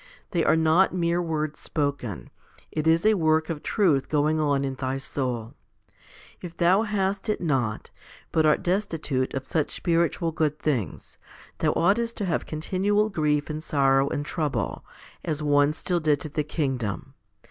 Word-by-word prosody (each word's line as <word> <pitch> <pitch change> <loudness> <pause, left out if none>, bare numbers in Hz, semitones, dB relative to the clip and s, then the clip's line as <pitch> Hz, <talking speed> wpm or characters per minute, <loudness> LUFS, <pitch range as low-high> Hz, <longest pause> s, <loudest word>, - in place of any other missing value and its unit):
They 170 -2 +1
are - - +4
not 160 +4 +3
mere 170 0 +1
words 155 -3 -2
spoken; 140 - -3 0.4
it 155 0 -2
is 165 +3 +3
a 215 - +6
work 160 -3 +2
of 150 -2 -5
truth 165 -9 +1
going 155 +1 +2
on 140 -2 +1
in 135 - -2
thy 130 0 -3
soul. 125 -4 -3 0.9
If 175 -2 -8
thou 180 +4 +4
hast 200 -1 -1
it 210 - 0
not, 130 -10 -1 0.4
but 160 - +3
art 155 -1 +3
destitute 160 -9 -1
of 135 0 -3
such 155 +1 0
spiritual 170 -1 +1
good 155 -1 0
things, 125 - -3 0.4
thou - - +2
oughtest 230 +6 +1
to 205 - -2
have 170 -4 -1
continual 195 +7 0
grief 150 -6 0
and 155 0 -5
sorrow 135 -2 +2
and 145 - -3
trouble, 150 0 -2 0.4
as 155 -2 -2
one 145 0 +4
still 175 +3 -1
dead 150 -3 +2
to 155 - -5
the 150 +1 -1
kingdom. 130 - -3
155 Hz, 160 wpm, -25 LUFS, 145-170 Hz, 0.9 s, a